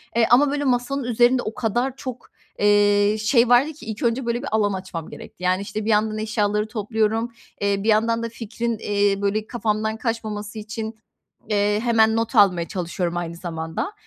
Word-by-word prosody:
Eee, 230 -1 +4
ama, 275 +3 +5
böyle, 290 0 -1
masanın 260 +1 0
üzerinde 245 +1 +3
o 215 - -4
kadar 245 +2 -1
çok, 255 -3 -8 0.3
eee, 205 0 +4
şey 235 +2 +3
vardı 270 +6 +4
ki 305 - -13
ilk 220 0 -5
önce, 235 +2 0
böyle, 235 +1 -1
bir 280 - -5
alan 210 -2 +2
açmam 185 -4 -6
gerekti. 180 - -11
Yani, 185 +1 +2
işte, 210 +1 -5
bir - - -1
yandan 215 0 +2
eşyaları 210 -1 0
topluyorum. 220 +1 -1 0.3
Eee, 200 0 0
bir 225 - 0
yandan 230 +2 +2
da 230 - -3
fikrin, 230 0 -4
eee, 200 -1 +1
böyle, 210 +2 -1
kafamdan 220 -2 -1
kaçmaması 215 -2 -4
için, 220 +1 -6 0.5
eee, 205 0 +2
hemen 225 -2 +4
not 230 +2 -1
almaya 180 -5 +4
çalışıyorum 175 -1 -3
aynı 170 -1 -4
zamanda. 165 - -4
220 Hz, 180 wpm, -22 LUFS, 205-235 Hz, 0.5 s, ama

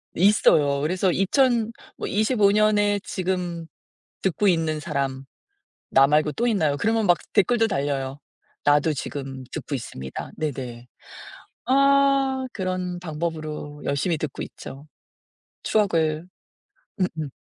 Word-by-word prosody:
있어요. 160 -7 +4
그래서 180 +5 +1
"2,000 230 +4 +2 0.3
뭐 - - -4
25 215 0 +3
년에 205 -1 +3
지금 180 -3 -3 0.6
듣고 195 +2 +1
있는 160 -3 +1
사람 135 -3 -3 0.7
나 135 - +6
말고 150 +1 +2
또 235 - -1
있나요?" 160 -10 +1
그러면 225 0 +1
막 175 -2 +5 0.2
댓글도 225 +3 +3
달려요. 140 -6 -2 0.4
"나도 145 +2 +4
지금 135 -1 -6
듣고 145 - -5
있습니다." 65 - -7
네네. 125 -5 -5 0.8
아. 275 0 +3
그런 185 -2 -3
방법으로 155 -3 -5
열심히 150 +4 0
듣고 150 -3 -4
있죠. 140 +3 -10 0.8
추억을 165 -6 +1 0.7
음음. 160 -5 -2
170 Hz, 225 characters per minute, -24 LUFS, 145-205 Hz, 0.8 s, 나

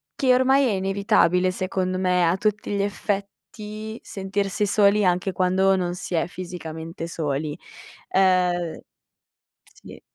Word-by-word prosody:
che 260 -2 +3
ormai 265 +2 +4
è - - +1
inevitabile 190 -2 +2
secondo 185 0 -2
me 180 -1 +2
a 175 +3 +2
tutti 210 0 -1
gli 200 - 0
effetti 210 +2 -5
sentirsi 195 +1 -2
soli 205 0 +4
anche 180 +2 +1
quando 190 +1 +2
non 180 -1 -2
si 180 - -5
è 165 0 +1
fisicamente 165 -2 -7
soli. 150 -2 -3 0.5
Uhm, 180 -3 +2 0.8
sì. - - -15
190 Hz, 125 wpm, -23 LUFS, 180-200 Hz, 0.8 s, ormai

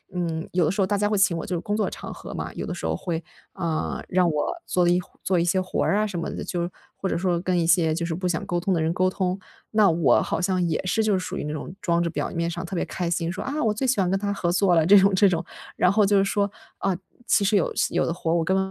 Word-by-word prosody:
嗯， 165 -2 -2
有 175 -3 +3
的 - - +1
时 195 - -1
候 190 - +2
大 205 - +1
家 205 +1 +1
会 210 - +1
请 190 -3 +3
我 - - -4
就 180 - -2
是 170 - -1
工 205 - -2
作 215 - 0
场 - - -8
合 - - -9
嘛， - - -4
有 - - -5
的 - - -4
时 - - -6
候 - - 0
会， 170 -2 -3 0.3
啊， 160 -2 -2
让 180 -1 +3
我 150 -2 -1
做 180 -1 +2
一 175 +1 +4 0.2
做 185 -2 +2
一 - - +2
些 185 +2 +2
活 185 - -1
啊， 210 +2 +2
什 185 -4 -4
么 - - -3
的， - - -5
就 175 -2 -3
是 175 - -2 0.3
或 195 - -2
者 - - 0
说， 175 -1 0
跟 180 0 0
一 165 - +1
些， 160 -2 +4
就 170 0 -2
是 170 - -2
不 185 +1 -2
想 160 -3 -1
沟 175 0 -1
通 190 +2 0
的 165 - +1
人 160 +1 +1
沟 185 +1 +2
通。 185 0 -2 0.3
那 215 -3 +5
我 165 -2 +3
好 - - -2
像 185 0 +1
也 160 - -1
是 185 +5 +1
就 215 - +2
是 190 - +2
属 180 - -5
于 - - -3
那 150 - -3
种 155 - -6
装 170 -2 +1
着 170 - -1
表 - - -3
面 170 -1 -1
上 175 +2 -5
特 185 - -6
别 - - 0
开 175 -2 -3
心， 170 0 -1
说 - - -5
“啊， 290 +3 -2
我 220 -2 +2
最 225 +6 -2
喜 245 -5 +2
欢 180 - +1
跟 195 - +1
他 200 0 -1
合 175 -3 -1
作 185 0 +3
了” 160 - +4
这 205 - +8
种 195 +1 +4
这 200 +1 +5
种， 170 -1 -1 0.3
然 180 - +4
后 210 0 +4
就 200 0 +3
是 195 - +3
说， 200 0 0 0.3
啊， 195 -2 0 0.3
其 200 - +3
实 205 +1 +2
有 190 - +2 0.2
有 - - +1
的 165 - -1
活， 165 -1 -1
我 165 - +2
根 190 +3 +1
180 Hz, 330 characters per minute, -24 LUFS, 170-195 Hz, 0.3 s, 这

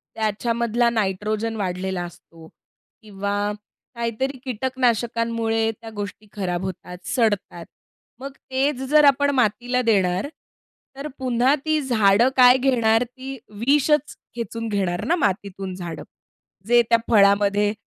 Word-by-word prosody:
त्याच्यामधला 235 +2 0
नायट्रोजन 215 +1 -1
वाढलेला 185 -1 -3
असतो 165 -1 -14 0.5
किंवा 200 -1 -4 0.6
काहीतरी 235 +4 -2
कीटकनाशकांमुळे 230 -2 0
त्या 225 - -8
गोष्टी 205 +1 -7
खराब 180 -3 -3
होतात, 180 -1 -7
सडतात. 205 -8 -1 0.5
मग 275 +1 -7 0.2
तेच 265 0 0
जर 300 0 +6
आपण 285 0 +4
मातीला 245 +2 +1
देणार 195 -2 +1 0.7
तर 275 +2 -6
पुन्हा 255 +1 +2
ती 310 0 +2
झाडं 230 -3 +3
काय 250 0 +8
घेणार 235 -3 +2
ती 260 +2 -9 0.3
विषच 295 +1 +2 0.2
खेचून 230 -1 -4
घेणार 190 -4 -1
ना 340 - +2
मातीतून 195 - -2
झाडं. 175 -3 -7 0.6
जे 240 +1 +6
त्या 230 - +5
फळामध्ये 205 -1 +4
225 Hz, 115 wpm, -22 LUFS, 200-255 Hz, 0.7 s, काय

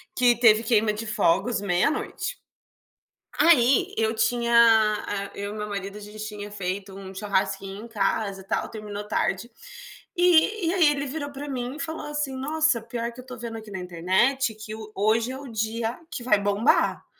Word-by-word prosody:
Que 245 -2 +4
teve 225 -1 +6
queima 220 -2 +3
de 220 +2 -5
fogos 215 +2 +1
meia-noite. 205 - -1 1.0
Aí, 265 -6 +4
eu 220 0 +1
tinha 235 +2 +1 0.6
a 200 -1 -3
eu 200 +1 -4
e - - -8
meu 210 0 -4
marido, 200 0 -5
a - - -11
gente, 210 +1 -11
tinha 205 -1 -7
feito 195 0 -4
um 195 -1 -9
churrasquinho 195 +1 -2
em - - -10
casa, 200 -2 -1
e - - -19
tal, - - -2
terminou 210 -1 -7
tarde. 235 +2 -1 0.7
E 355 +2 +4
e 350 - +1
aí, 345 -5 +5
ele 285 0 -3
virou 285 +1 -4
pra 285 +1 -7
mim 255 +1 -4
e - - -8
falou 320 -1 -4
assim: 295 -2 -2
"Nossa, 300 -3 +1
pior 235 0 -4
que 250 - -11
eu 255 - -15
tô 250 -1 -9
vendo 230 -1 -6
aqui 220 -1 -11
na 190 - -5
internet 190 +9 +1
que 215 0 -8
o 215 -1 -9
hoje 225 +4 +1
é 265 - -6
o 280 - -9
dia 225 +1 -2
que 255 - -5
vai 235 -4 +4
bombar". 205 +6 +2
225 Hz, 190 wpm, -25 LUFS, 205-260 Hz, 1.0 s, teve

